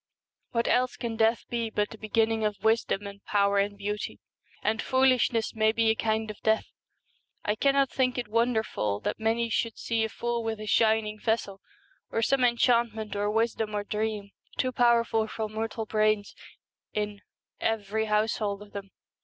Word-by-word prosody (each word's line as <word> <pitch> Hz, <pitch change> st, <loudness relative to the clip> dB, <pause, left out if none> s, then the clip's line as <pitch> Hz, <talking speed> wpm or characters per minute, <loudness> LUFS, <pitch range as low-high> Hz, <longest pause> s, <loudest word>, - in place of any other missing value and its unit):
What 235 Hz, -1 st, 0 dB
else 255 Hz, 0 st, +2 dB
can 230 Hz, -1 st, -3 dB
death 225 Hz, +1 st, +2 dB
be 235 Hz, -1 st, -2 dB
but 210 Hz, -1 st, -1 dB
the 220 Hz, -, -9 dB
begin 220 Hz, +1 st, +2 dB
ning 225 Hz, -1 st, -1 dB
of 210 Hz, -2 st, -2 dB
wisdom 220 Hz, -2 st, +1 dB
and 200 Hz, 0 st, -9 dB
power 200 Hz, -1 st, +2 dB
and 200 Hz, 0 st, 0 dB
beauty? 205 Hz, +1 st, -4 dB, 0.4 s
and 220 Hz, +2 st, +1 dB
foolishness 255 Hz, -3 st, +2 dB
may 220 Hz, 0 st, +3 dB
be 225 Hz, 0 st, +3 dB
a -, -, 0 dB
kind 220 Hz, -1 st, 0 dB
of 210 Hz, -, -14 dB
death. 220 Hz, 0 st, +2 dB, 0.8 s
I 210 Hz, -, +2 dB
cannot 275 Hz, +3 st, +2 dB
think 255 Hz, -1 st, +1 dB
it 245 Hz, -, -2 dB
wonderful 220 Hz, -, 0 dB
that -, -, -2 dB
many 225 Hz, +1 st, +1 dB
should 230 Hz, 0 st, -1 dB
see 230 Hz, -1 st, 0 dB
a 220 Hz, -, -1 dB
fool 235 Hz, +1 st, -2 dB
with 225 Hz, -1 st, -3 dB
a 215 Hz, -, -6 dB
shining 220 Hz, -1 st, +2 dB
vessel 205 Hz, -3 st, -1 dB, 0.5 s
of 225 Hz, -, +1 dB
some 270 Hz, -1 st, +2 dB
enchantment 235 Hz, -3 st, +2 dB
or 205 Hz, 0 st, 0 dB
wisdom 220 Hz, -1 st, 0 dB
or 205 Hz, -, -1 dB
dream 210 Hz, -1 st, -3 dB, 0.3 s
too 255 Hz, -, +1 dB
powerful 235 Hz, -2 st, +3 dB
for 220 Hz, 0 st, -3 dB
mortal 220 Hz, +1 st, -3 dB
brains 215 Hz, -1 st, +1 dB, 0.6 s
in 210 Hz, -1 st, -3 dB, 0.2 s
' -, -, -51 dB
every 220 Hz, 0 st, 0 dB
household 210 Hz, -1 st, 0 dB
of 205 Hz, -, -17 dB
them.' 200 Hz, -1 st, -7 dB
220 Hz, 175 wpm, -28 LUFS, 210-230 Hz, 0.8 s, may